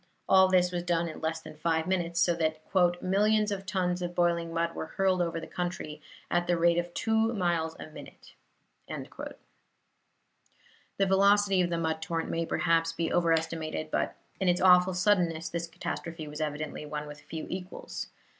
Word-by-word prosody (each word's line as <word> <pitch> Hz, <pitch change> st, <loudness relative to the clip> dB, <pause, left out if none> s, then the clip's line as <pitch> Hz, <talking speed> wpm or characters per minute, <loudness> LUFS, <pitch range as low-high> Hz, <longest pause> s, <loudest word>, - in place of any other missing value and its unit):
All 190 Hz, 0 st, +7 dB
this 180 Hz, -1 st, +3 dB
was 175 Hz, -1 st, -2 dB
done 170 Hz, -1 st, 0 dB
in 160 Hz, -, -7 dB
less 160 Hz, 0 st, -2 dB
than -, -, -11 dB
five 160 Hz, +1 st, 0 dB
minutes, 175 Hz, -2 st, 0 dB
so 170 Hz, 0 st, +4 dB
that 160 Hz, -2 st, -1 dB, 0.4 s
"millions 210 Hz, +3 st, +2 dB
of 195 Hz, -1 st, -4 dB
tons 180 Hz, -2 st, 0 dB
of 175 Hz, 0 st, -4 dB
boiling 170 Hz, -1 st, +1 dB
mud 165 Hz, 0 st, -1 dB
were -, -, -5 dB
hurled 190 Hz, -1 st, +1 dB
over 165 Hz, -1 st, -1 dB
the 165 Hz, -, -7 dB
country 175 Hz, -4 st, -4 dB, 0.3 s
at 175 Hz, 0 st, +1 dB
the 175 Hz, -, +2 dB
rate 170 Hz, 0 st, +4 dB
of 175 Hz, 0 st, -4 dB
two 225 Hz, 0 st, +2 dB
miles 170 Hz, -4 st, 0 dB
a -, -, -6 dB
minute." 155 Hz, -, -13 dB, 0.6 s
The -, -, -7 dB, 1.7 s
velocity 195 Hz, 0 st, +4 dB
of 175 Hz, -, +1 dB
the 170 Hz, -, -1 dB
mud 160 Hz, -1 st, -1 dB
torrent 165 Hz, 0 st, -2 dB
may 165 Hz, 0 st, -1 dB
perhaps 165 Hz, -1 st, +2 dB
be 165 Hz, 0 st, -2 dB
overestimated, 160 Hz, -2 st, 0 dB
but -, -, 0 dB, 0.2 s
in 190 Hz, -, 0 dB
its 175 Hz, 0 st, +2 dB
awful 180 Hz, 0 st, +6 dB
suddenness 175 Hz, -4 st, +2 dB
this 170 Hz, 0 st, -3 dB
catastrophe 165 Hz, -1 st, -5 dB
was 150 Hz, +1 st, -6 dB
evidently 150 Hz, 0 st, -3 dB
one 150 Hz, 0 st, -5 dB
with 145 Hz, 0 st, -10 dB
few 160 Hz, +1 st, -6 dB
equals. 185 Hz, 0 st, -6 dB
170 Hz, 175 wpm, -29 LUFS, 160-185 Hz, 1.7 s, All